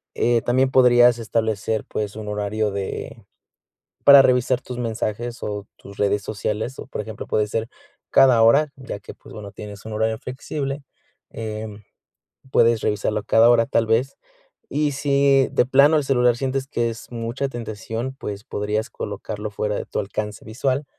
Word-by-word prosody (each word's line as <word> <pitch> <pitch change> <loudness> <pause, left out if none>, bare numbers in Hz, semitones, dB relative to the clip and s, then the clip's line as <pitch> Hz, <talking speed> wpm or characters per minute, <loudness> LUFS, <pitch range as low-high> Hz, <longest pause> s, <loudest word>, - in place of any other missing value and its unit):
Eh, 120 -1 +2
también 130 +3 +2
podrías 120 -2 +5
establecer, 110 -1 -1
pues, 105 -1 -4
un 110 -1 -7
horario 105 +1 -1
de 100 -1 -5 0.8
para 140 -1 +9
revisar 125 0 +2
tus 125 -1 -7
mensajes 115 0 -3
o 105 -1 -4
tus 100 - -14
redes 100 0 +1
sociales, 110 +5 -3
o - - -8
por 130 - -4
ejemplo, 105 0 -8
puede 105 - +1
ser 110 +2 -3 0.4
cada 125 -4 +6
hora, 140 +7 +5
ya 130 -6 -7
que, - - -11
pues, - - -16
bueno, 100 -2 -8
tienes 105 -1 -10
un 110 - -6
horario 110 +1 0
flexible. 135 +3 -5 0.5
Em, 110 -1 -6 0.7
puedes 115 -2 +4
revisarlo 105 0 0
a - - -20
cada 115 +3 +5
hora 115 -1 +5
tal 115 - +1
vez. 115 +5 +1 0.5
Y 150 0 0
si 140 -1 +3
de - - +3
plano 140 +4 +5
el 150 - +1
celular 125 -3 +3
sientes 135 +1 -2
que 120 -4 -1
es 115 - -10
mucha 120 +4 -3
tentación, 115 +1 -5
pues, 100 -1 -6
podrías 105 -2 -2
colocarlo 105 +1 -5
fuera 105 +1 -2
de - - -3
tu - - -2
alcance 105 +1 -5
visual 130 +5 -1
115 Hz, 165 wpm, -22 LUFS, 105-130 Hz, 0.8 s, para